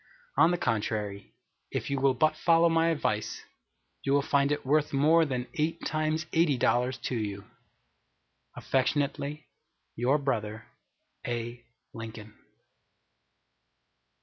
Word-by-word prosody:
On 160 +4 +6
the 175 - +1
contrary, 105 - -2 0.3
if - - -3
you 140 -1 -1
will 135 -1 +3
but 155 +4 +2
follow 165 +1 +4
my 165 0 +3
advice, 110 -9 -1 0.6
you 135 - 0
will 140 0 +3
find 140 0 +2
it 145 - -2
worth 150 +2 +2
more 160 +4 +4
than 125 -4 -2
eight 160 -1 -2
times 155 +1 -1
eighty 160 -5 +3
dollars 125 +1 +1
to 125 - -2
you. 100 -3 -3 1.1
Affectionately 140 +2 -1 0.5
your 125 +5 +2
brother, 110 -6 -2 0.6
A. 120 0 -4 0.3
LINCOLN. 110 -2 -8
140 Hz, 120 wpm, -29 LUFS, 115-155 Hz, 1.1 s, On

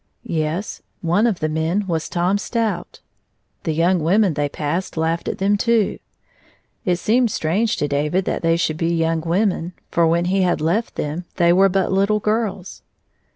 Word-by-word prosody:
Yes; 160 +5 -3 0.2
one 180 +7 +3
of 210 -7 -1
the 155 - +1
men 160 +6 -1
was 165 -4 -2
Tom 180 +3 +1
Stout. 215 -5 -3 0.6
The 160 - 0
young 170 +4 +2
women 190 +3 +3
they 145 0 -1
passed 160 +6 -3
laughed 165 +1 -1
at - - -2
them, 200 +2 +2
too. 230 -2 +1 0.9
It 180 - +2
seemed 235 +6 +2
strange 200 +6 0
to 145 - 0
David 150 +6 0
that - - -2
they 165 0 +2
should 155 -3 -1
be 170 +1 0
young 165 0 0
women, 180 +1 0 0.2
for 170 -1 +3
when 170 +1 +2
he 190 +2 +1
had 180 -1 +1
left 175 +9 -1
liiem 155 +4 -3
they 170 -1 +4
were 195 +2 +5
but 190 0 0
little 200 +2 +2
girls. 210 -3 -2
175 Hz, 175 wpm, -21 LUFS, 165-200 Hz, 0.9 s, were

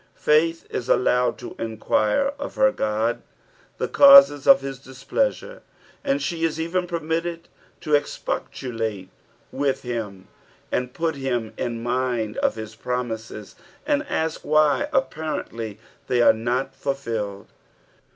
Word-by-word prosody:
Fmth 165 +2 +2
is 125 - -4
al - - +5
lowed 125 0 +1
to 120 - -9
enquire 110 - 0
of 285 - -6
her 265 - +5
Ood 110 - -1 0.6
the - - -1
causes 275 - +7
of 180 -7 +8
hts 135 -1 -7
displeasure, - - -2 0.4
and 280 -1 +1
she 170 - -3
is 160 -1 0
even 180 +2 -1
permitted 165 0 -3 0.3
to 150 - -3
expostulate 115 -8 -2 0.4
with 135 0 -1
him 110 -6 -5 0.4
and 125 0 -2
put 165 -1 0
him 125 -5 -3
in 115 -2 -4
mind 120 -3 -1
of - - +1
his 110 -1 -7
promises, 110 -3 -5 0.3
and 290 -1 +1
ask 160 0 -1
why 155 - +3
apparently 155 - -3 0.3
they] 125 - +1
are - - +7
not 125 +4 -2
fulfilled. 115 -8 -4
130 Hz, 130 wpm, -23 LUFS, 115-165 Hz, 0.6 s, of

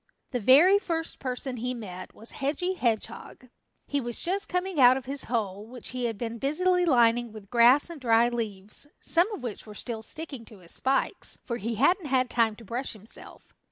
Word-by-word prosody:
The 250 - -1
very 305 - +6
first 330 -4 -3
person 255 0 -3
he 250 +2 -2
met 185 -5 -8
was 225 - -7
Hedgy 305 +7 -1
Hedgehog. 240 - -3 0.4
He 285 -1 -1
was 240 -1 -1
just 390 +4 0
coming 360 -2 -1
out 255 0 +7
of 265 - -7
his 275 +1 -3
hole, 210 -4 -2
which 245 0 -8
he 250 -1 -3
had 225 -3 -2
been 230 0 -4
busily 360 +7 +2
lining 240 -5 +3
with 210 -2 -12
grass 245 +4 +6
and 335 -4 -9
dry 230 -1 +4
leaves, 215 0 -5
some 355 +6 +2
of 410 - -6
which 225 -2 -6
were 210 - -10
still 225 0 -5
sticking 275 +1 -5
to 215 - -14
his 175 -3 -11
spikes, 270 +1 0
for 235 - -3
he 230 +2 -3
hadn't 315 - +2
had 255 -2 +1
time 225 -2 +2
to 230 - -14
brush 245 +6 -3
himself. 215 +1 -9
245 Hz, 195 wpm, -27 LUFS, 225-285 Hz, 0.4 s, out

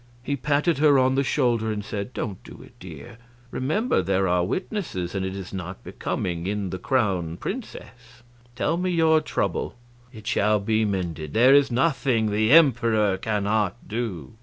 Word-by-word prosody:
He 140 +3 -1
patted 145 +3 0
her 145 -2 +5
on 130 0 +3
the 135 +1 +1
shoulder 120 -5 +1
and 105 -1 -4
said: 100 +3 -5
"Don't 100 -7 -5
do - - -12
it, - - -17
dear; 115 - -11 0.3
remember, 205 - 0
there 95 +1 0
are 90 0 +2
witnesses, 95 - -3
and 95 -1 -2
it 95 0 -4
is 95 -1 -8
not 90 0 -6
becoming 85 -1 -4
in 100 -2 -2
the 95 - -5
Crown 95 - 0
Princess. 125 - -8 0.3
Tell 165 +6 0
me 185 +1 -1
your 160 -2 +3
trouble - - -2 0.4
it 110 -4 -12
shall 105 -1 +2
be 110 +2 +1
mended; 85 -7 -3
there 125 +4 +6
is 140 -1 +5
nothing 125 -4 +1
the 110 +2 +1
Emperor 115 -10 +4
cannot 105 0 -1
do." 105 - -4
110 Hz, 165 wpm, -24 LUFS, 95-135 Hz, 0.4 s, there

